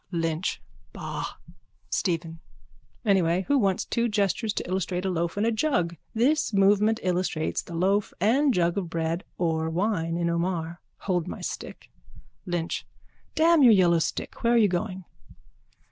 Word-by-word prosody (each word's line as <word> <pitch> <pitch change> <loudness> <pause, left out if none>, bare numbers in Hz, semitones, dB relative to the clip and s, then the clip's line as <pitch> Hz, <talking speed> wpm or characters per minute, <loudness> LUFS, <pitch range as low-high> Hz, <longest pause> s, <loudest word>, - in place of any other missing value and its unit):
LYNCH: 165 0 -1 0.3
Ba! - - -5 0.7
STEPHEN: 165 -2 -1 0.7
Anyway, 185 -3 +2
who 285 -1 +3
wants 195 -4 +1
two 235 0 0
gestures 210 +1 0
to - - -4
illustrate 185 0 -2
a 190 - 0
loaf 170 +1 -2
and 205 - +1
a 230 - +2
jug? 215 - 0 0.2
This 260 +2 +2
movement 205 +3 +4
illustrates 180 -3 -1
the 170 - -9
loaf 195 +4 +1
and 265 +9 +3
jug 175 -2 +1
of 180 -4 -5
bread 165 +2 -2
or 160 -2 0
wine 170 -2 -1
in 170 -1 0
Omar. 170 0 -2 0.2
Hold 180 -4 -1
my - - -6
stick. - - -7 0.6
LYNCH: 175 -2 -2 0.5
Damn 325 0 +5
your 245 -4 +8
yellow 175 -4 +4
stick. 165 - -4
Where 235 0 +3
are - - +5
we 220 -3 +5
going? 185 0 -3
185 Hz, 150 wpm, -26 LUFS, 170-210 Hz, 0.7 s, your